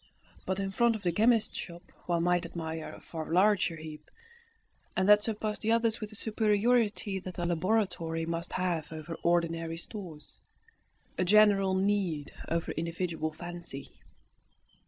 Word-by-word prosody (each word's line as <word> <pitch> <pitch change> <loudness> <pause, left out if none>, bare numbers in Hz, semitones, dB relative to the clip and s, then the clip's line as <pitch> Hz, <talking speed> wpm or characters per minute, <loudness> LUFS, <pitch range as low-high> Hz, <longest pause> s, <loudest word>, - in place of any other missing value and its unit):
But 190 +1 0
in 195 0 -2
front 235 +3 +3
of 210 - -7
the 175 - +2
chemist's 225 +4 +3
shop 170 0 -8 0.2
one 170 -1 +1
might 175 0 +2
admire 160 -2 -5
a - - -11
far 160 -1 -7
larger 185 -1 +3
heap, 155 -1 -10 0.9
and 185 - +2
that 210 0 +7
surpassed 215 -1 -2
the 225 - +1
others 230 -1 +2
with 215 - -4
the 215 - -11
superiority 215 -1 +1
that 185 0 -8
a 175 - -1
laboratory 175 -2 0
must 165 +1 -3
have 175 -5 -1
over 160 +1 -6
ordinary 165 -1 +1
stores, 170 -5 -8 0.8
a - - +4
general 195 -1 +5
need 190 -6 0
over 165 0 -1
individual 165 -1 -2
fancy. 175 -4 -8
180 Hz, 145 wpm, -30 LUFS, 165-210 Hz, 0.9 s, that